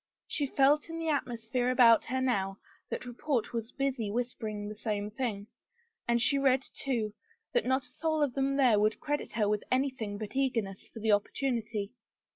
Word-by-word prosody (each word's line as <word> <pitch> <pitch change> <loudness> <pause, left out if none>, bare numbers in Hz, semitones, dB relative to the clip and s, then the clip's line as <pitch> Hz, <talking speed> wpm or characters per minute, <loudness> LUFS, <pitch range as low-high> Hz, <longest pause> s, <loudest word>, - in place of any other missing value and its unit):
She 290 -3 -1
felt 285 +4 +3
in 330 - -5
the 325 -1 -2
atmosphere 245 -3 -1
about 240 -3 +6
her 260 +1 -1
now 195 -7 0 0.3
that - - -4
report 245 0 -2
was 230 0 -3
busy 270 -6 -1
whis 245 +3 -1
pering 210 -2 -5
the 210 - -5
same 210 -1 -3
thing, 215 -4 -3 0.6
and 235 0 +3
she 275 +4 +3
read, 265 -1 +3
too, 230 -6 -1 0.4
that 485 - +2
not 260 +1 +2
a 250 0 -11
soul 315 0 +1
of 275 -4 0
them 275 +1 +1
there 250 -7 +5
would 215 +1 +2
credit 295 -1 -2
her 210 -1 +1
with 210 0 0
anything 255 -6 0
but 215 +3 -7
eager 260 -4 +2
ness 195 -1 -10
for - - -10
the 220 0 +2
opportunity. 215 -1 0
245 Hz, 190 wpm, -31 LUFS, 215-270 Hz, 0.6 s, about